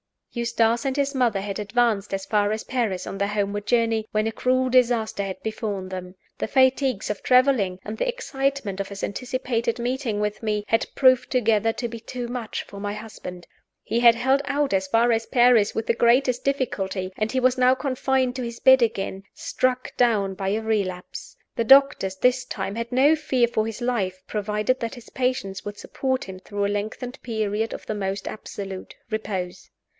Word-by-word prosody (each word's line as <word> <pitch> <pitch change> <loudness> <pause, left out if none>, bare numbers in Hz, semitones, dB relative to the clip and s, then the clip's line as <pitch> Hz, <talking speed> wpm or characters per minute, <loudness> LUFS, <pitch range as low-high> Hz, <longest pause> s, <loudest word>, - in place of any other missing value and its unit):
Eustace 235 +1 +1
and 265 -1 0
his 280 0 0
mother 240 -7 +1
had 200 0 -4
advanced 210 -1 +1
as 195 0 -2
far 210 -1 +1
as 215 - -4
Paris 230 -8 -2
on - - -6
their 200 - +1
homeward 205 0 -2
journey, 230 -2 +1
when 215 0 +1
a 225 - 0
cruel 255 +2 +1
disaster 240 -5 +2
had 190 -1 -5
befallen 210 -4 -3
them. 185 0 -7 0.2
The - - -1
fatigues 260 -2 +2
of 210 - -5
traveling, 250 -8 +3
and 215 +1 -6
the - - -1
excitement 275 - -2
of 200 - -2
his 200 0 -8
anticipated 240 0 -2
meeting 245 -2 -2
with 210 0 -2
me, 210 -2 -1
had 225 - +2
proved 255 -2 +4
together 225 -3 +2
to 240 - -3
be 230 0 -7
too 240 +1 -6
much 240 -3 -4
for 200 - -11
my 205 0 -3
husband. 180 -5 -8 0.4
He 230 - -1
had 235 -1 +7
held 265 +4 +2
out 285 -3 0
as 190 0 +1
far 230 +4 +3
as 225 0 +1
Paris 240 -4 +4
with 225 - -1
the - - +2
greatest 245 +2 +2
difficulty; 195 -9 -1
and 215 +1 -1
he 260 - 0
was 255 0 +3
now 255 0 +5
confined 260 -1 0
to - - -3
his 235 -1 -6
bed 260 -1 +7
again, 195 -4 -1
struck 255 0 -1
down 210 -6 +2
by 190 0 -3
a 215 +3 0
relapse. 200 -5 -3 0.2
The 230 - +1
doctors, 270 -8 +5
this 250 +5 +2
time, 195 -4 -4
had 230 +1 -4
no 275 +5 +5
fear 260 -5 +2
for 220 -2 0
his 225 +2 -6
life, 195 -7 -1
provided 210 +4 -1
that 230 +2 -4
his 240 -2 -13
patience 250 -7 -2
would 205 0 -6
support 260 +3 -2
him 190 -1 -8
through 205 +1 -3
a - - 0
lengthened 215 +6 -4
period 220 -1 -2
of - - -8
the - - -3
most 195 -1 -3
absolute 195 -3 -7 0.2
repose. 190 -5 -4
225 Hz, 190 wpm, -24 LUFS, 205-255 Hz, 0.4 s, had